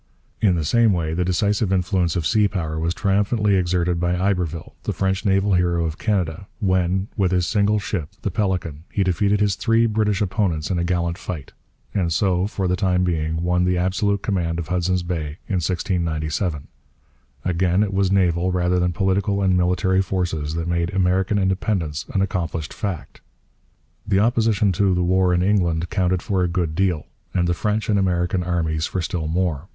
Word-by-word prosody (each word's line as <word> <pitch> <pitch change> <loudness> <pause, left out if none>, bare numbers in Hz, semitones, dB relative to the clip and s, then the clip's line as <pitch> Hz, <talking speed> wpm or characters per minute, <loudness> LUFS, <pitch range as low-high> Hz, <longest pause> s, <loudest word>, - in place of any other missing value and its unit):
In 95 -5 +4
the 80 -3 -1
same 115 +4 +4
way 80 -3 -1
the 90 +2 0
decisive 100 +3 +1
influence 90 -2 +1
of 85 -4 -1
sea 105 +5 +3
power 80 -5 -3
was 85 +2 -1
triumphantly 105 0 +1
exerted 90 -1 +1
by 90 +1 0
Iberville, 90 -4 -1
the - - -3
French 95 +2 -1
naval 95 0 +2
hero 85 -2 +2
of 80 0 -4
Canada, 95 -3 -1
when, 95 -1 +1
with 95 -4 +1
his 90 -1 +2
single 105 +2 +2
ship, 90 -7 -3
the - - -1
Pélican, 90 -8 -1
he 100 - +1
defeated 100 +3 +1
his 100 -2 +3
three 115 +4 +2
British 105 -3 +1
opponents 95 -5 -1
in 90 - 0
a - - 0
gallant 85 0 -1
fight; 80 -9 -6 0.4
and 90 -4 0
so, 90 +2 +1
for 95 -3 -2
the 90 - +1
time 90 -1 +1
being, 80 -2 -1
won 90 0 +2
the 90 0 +1
absolute 95 +3 0
command 85 -5 -1
of 85 -2 -5
Hudson 90 +1 +1
Bay 80 -4 -3
in 95 -4 0
1697. 80 -2 -2 0.8
Again, 90 +2 +2
it 100 -2 -3
was 95 -1 +1
naval 90 -2 +2
rather 90 0 +1
than 90 0 +1
political 100 +2 0
and 95 -1 +3
military 90 +1 +2
forces 90 -5 -2
that 85 0 -3
made 85 +1 0
American 95 +2 +2
independence 95 -4 -1
an 95 - +1
accomplished 85 -5 -3
fact. 100 -6 -5 0.9
The 100 -2 +2
opposition 110 -2 +2
to 95 +1 +2
the 90 - +1
war 90 +1 +2
in 90 0 +2
England 90 -4 +1
counted 90 -2 0
for 100 -6 0
a 90 - +2
good 85 -2 -1
deal; 90 -3 0 0.3
and 90 -1 +2
the 85 - +2
French 105 +4 -1
and 105 -2 +2
American 90 -1 0
armies 80 -3 -1
for 90 - -3
still 85 -2 -3
more. 85 -2 -1
90 Hz, 185 wpm, -22 LUFS, 85-100 Hz, 0.9 s, In